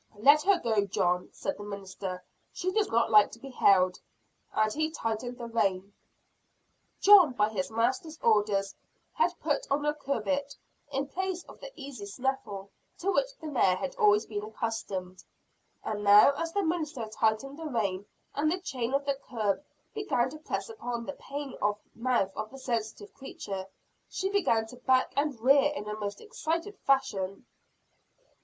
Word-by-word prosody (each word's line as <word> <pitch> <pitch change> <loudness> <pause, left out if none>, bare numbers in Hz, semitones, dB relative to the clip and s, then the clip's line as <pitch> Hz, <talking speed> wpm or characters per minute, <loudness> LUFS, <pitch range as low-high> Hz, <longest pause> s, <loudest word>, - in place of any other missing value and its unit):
"Let 285 +8 +6
her 395 +4 +4
go, 220 -9 +1
John," 180 -2 0
said 290 - -4
the - - -6
minister; 195 -2 -6 0.3
"she 370 0 -2
does 425 0 +1
not 230 0 +2
like 210 -1 +7
to 230 - -10
be 270 +2 -9
held," 185 -6 +4 0.5
and 215 0 +1
he 310 +1 0
tightened 245 -3 -3
the 240 - -6
rein. 200 -4 0 1.1
John, 380 -9 +8
by 210 -2 +2
his 190 -4 -2
master's 255 +8 -1
orders, 205 -3 +2 0.4
had 470 - +1
put - - -1
on 290 +1 +1
a 295 - +2
curbbit; 280 0 -2 0.4
in 275 0 -1
place 370 +3 -3
of - - -14
the - - -9
easy 270 -8 -8
snaffle 205 -4 -3 0.3
to 390 +3 0
which - - 0
the 315 - -10
mare 245 -11 +3
had 270 +8 -4
always 210 +1 +4
been 205 -2 -4
accustomed. 205 -4 -4 0.6
And 210 -1 -3
now 205 +6 +8
as 330 +4 -3
the 405 +3 0
minister 310 -8 -2
tightened 220 +6 -1
the 325 - -4
rein, 200 -7 -1 0.3
and 310 +2 +1
the 360 - +1
chain 260 -7 -2
of 280 0 0
the 280 -1 -1
curb 220 +1 0 0.3
began 260 - 0
to 310 - -9
press 310 - -3
upon 245 - -5
and 285 - -6
pain 285 -1 -6
the 205 -3 0 0.2
mouth 230 -5 0
of 215 0 -4
the 270 - -11
sensitive 245 - -3
creature, 195 -8 -6 0.4
she 385 - -2
began 235 - +2
to 250 +3 -12
back 255 +1 +2
and 285 -4 0
rear 275 +4 +5
in 210 - -5
a 210 - -3
most 205 -1 -5
excited 410 -3 -3
fashion. 200 -8 +1
245 Hz, 170 wpm, -29 LUFS, 210-295 Hz, 1.1 s, John